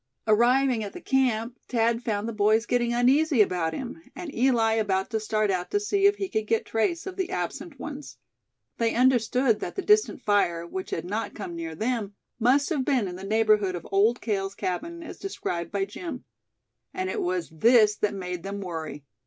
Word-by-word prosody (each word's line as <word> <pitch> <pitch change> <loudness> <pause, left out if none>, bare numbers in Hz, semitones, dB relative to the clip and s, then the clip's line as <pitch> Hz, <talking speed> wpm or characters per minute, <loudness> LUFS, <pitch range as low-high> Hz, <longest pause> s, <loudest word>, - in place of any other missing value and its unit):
Arriving 240 +2 +3
at 205 - -6
the - - -8
camp, 250 -5 0
Thad 230 -1 +1
found 215 -3 -2
the 230 - -3
boys 215 +2 +3
getting 240 -1 +1
uneasy 265 +4 +3
about 180 -5 +2
him, 250 - -6
and 350 -5 -7
Eli 235 -3 +3
about 200 -2 0
to 220 - 0
start 215 -1 0
out 180 -1 -2
to 410 - +1
see 400 -1 +3
if 405 - +3
he 390 - -3
could 220 -8 -2
get 225 0 +1
trace 225 - -1
of 380 -1 -7
the 380 -2 -1
absent 275 - -4
ones. 295 0 -7 0.6
They 230 -1 +1
understood 245 -1 +3
that - - -5
the 390 - -3
distant 420 0 +3
fire, 175 -5 +1
which 185 +2 -6
had 165 - -3
not 210 +5 -3
come 180 -5 -6
near 165 -1 -5
them, 220 0 -2 0.2
must 260 +5 +3
have 295 -6 0
been 255 -7 +1
in 180 - -6
the 185 - -9
neighborhood 210 -2 +2
of 170 - -7
Old 215 +5 +3
Cale's 195 -3 -2
cabin, 335 - -4
as - - -9
described 170 - -4
by 200 -1 0
Jim; 265 - -7 0.7
and 370 0 -2
it 420 +2 -2
was 360 -1 -2
this 215 +5 +5
that 210 -1 0
made 180 -2 -5
them 200 +2 -5
worry. 160 -6 -6
225 Hz, 195 wpm, -26 LUFS, 195-265 Hz, 0.7 s, this